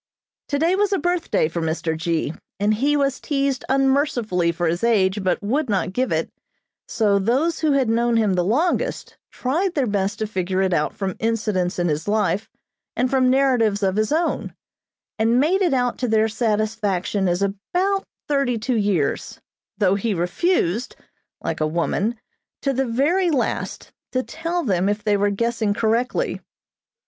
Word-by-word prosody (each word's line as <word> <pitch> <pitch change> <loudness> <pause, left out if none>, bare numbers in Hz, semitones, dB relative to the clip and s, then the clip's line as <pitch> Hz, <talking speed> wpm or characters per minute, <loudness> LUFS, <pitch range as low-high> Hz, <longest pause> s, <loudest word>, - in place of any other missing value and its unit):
Today 320 +5 +1
was 410 +1 +1
a 395 - +2
birthday 350 - 0
for 170 +1 -4
Mr. 160 0 -1
G., 160 -1 -1 0.3
and 205 +1 +2
he 285 +7 +1
was 275 -1 0
teased 275 -3 -1
unmercifully 265 - +2
for 175 +1 -2
his 170 +4 -1
age, 205 -4 +2
but 185 +2 0
would 260 +6 0
not 190 -2 0
give 255 +4 0
it, - - -1 0.6
so 205 -3 +2
those 265 - +1
who 310 -3 +2
had 270 -3 +2
known 235 +1 +2
him 215 -4 +2
the 180 -1 +1
longest 330 - 0 0.2
tried 335 +9 -1
their 280 -4 +2
best 205 -1 -1
to 220 - -2
figure 190 -2 -1
it 190 -1 +1
out 150 - 0
from 195 -2 -3
incidents 210 -5 0
in 175 -1 +1
his 155 +2 -2
life 205 -1 0 0.5
and 250 +1 0
from 260 -1 +3
narratives 245 -6 +2
of 190 -1 +1
his 215 +3 0
own, 330 +2 -1 0.6
and 230 +2 +3
made 350 +8 +2
it 360 - +3
out 245 -2 0
to 250 - 0
their 220 -1 +3
satisfaction 215 -4 0
as 175 +2 +1
about 360 - -1 0.2
thirty 275 -5 +1
two 235 +2 -1
years, 200 -9 -1 0.4
though 195 -2 +3
he 205 +1 -1
refused 200 - 0 0.5
(like - - -3
a 155 - +2
woman) 195 +8 -1 0.4
to 275 - +1
the 265 0 0
very 315 +10 +2
last, 280 -6 -2 0.2
to 255 0 +1
tell 335 +4 -3
them 190 -4 +1
if 205 0 -2
they 210 -2 +2
were 205 0 +2
guessing 220 0 0
correctly. 230 +3 0
225 Hz, 170 wpm, -22 LUFS, 195-275 Hz, 0.6 s, from